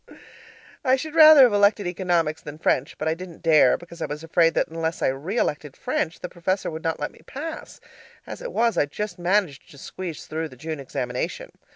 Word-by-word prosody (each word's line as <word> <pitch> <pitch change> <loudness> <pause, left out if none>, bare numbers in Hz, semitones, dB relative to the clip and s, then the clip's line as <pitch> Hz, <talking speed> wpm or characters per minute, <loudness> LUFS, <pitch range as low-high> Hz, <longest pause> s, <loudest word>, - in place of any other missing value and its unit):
I 260 -2 +4
should 300 +3 -6
rather 310 -3 +9
have 245 -4 +5
elected 205 0 +3
economics 170 -3 0
than 150 -1 -9
French, 140 -3 0
but 155 - -3
I 160 - +2
didn't 175 0 -10
dare, 155 -6 +5
because 170 -1 -13
I - - -1
was 150 +2 -6
afraid 165 0 +2
that - - +1
unless 165 0 -3
I - - +3
re 150 - -4
elected 145 - -2
French, 165 - -2
the - - -4
Professor 185 +2 -2
would 160 0 -7
not 165 0 -1
let 145 - -3
me - - -20
pass 315 +4 -7 0.5
as - - -8
it - - -6
was, 230 -1 +1
I 145 - +2
just 210 +6 -5
managed 175 -5 0
to 140 - -15
squeeze 170 +4 -7
through 160 +1 -4
the 130 - -14
June 155 +3 -5
examination. 125 -2 -4
165 Hz, 210 wpm, -24 LUFS, 155-205 Hz, 0.5 s, rather